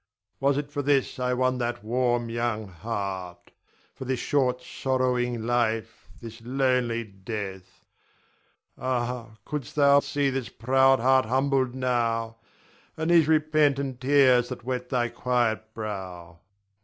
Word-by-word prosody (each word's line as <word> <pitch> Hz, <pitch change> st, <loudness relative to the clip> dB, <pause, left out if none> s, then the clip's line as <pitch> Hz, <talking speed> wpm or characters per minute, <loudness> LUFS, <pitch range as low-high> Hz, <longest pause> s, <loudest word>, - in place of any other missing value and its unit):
Was 140 Hz, 0 st, +2 dB
it 145 Hz, 0 st, -4 dB
for 145 Hz, -, -2 dB
this 140 Hz, -1 st, +1 dB
I 125 Hz, 0 st, 0 dB
won 130 Hz, 0 st, +1 dB
that 120 Hz, -3 st, -3 dB
warm 120 Hz, +1 st, 0 dB
young 115 Hz, -2 st, -2 dB
heart, 95 Hz, -2 st, -5 dB, 0.4 s
for 135 Hz, -, -8 dB
this 130 Hz, -1 st, -2 dB
short 125 Hz, -3 st, 0 dB
sorrowing 125 Hz, -3 st, -1 dB
life, 115 Hz, -2 st, -1 dB
this 115 Hz, 0 st, -10 dB
lonely 125 Hz, -2 st, 0 dB
death? 95 Hz, -3 st, -8 dB, 0.9 s
Ah, 120 Hz, -3 st, -3 dB
couldst 150 Hz, -4 st, -5 dB
thou 140 Hz, -1 st, +6 dB
see 145 Hz, -1 st, 0 dB
this 130 Hz, -2 st, -3 dB
proud 135 Hz, +2 st, +3 dB
heart 130 Hz, +2 st, +4 dB
humbled 130 Hz, +1 st, +1 dB
now, 115 Hz, -3 st, -1 dB, 0.6 s
and 160 Hz, +2 st, 0 dB
these 165 Hz, -3 st, +5 dB
repentant 150 Hz, -4 st, +2 dB
tears 130 Hz, -3 st, +4 dB
that 125 Hz, -2 st, -7 dB
wet 125 Hz, 0 st, -3 dB
thy 120 Hz, -2 st, +1 dB
quiet 120 Hz, -2 st, -1 dB
brow. 90 Hz, -6 st, -6 dB
125 Hz, 130 wpm, -26 LUFS, 115-135 Hz, 0.9 s, thou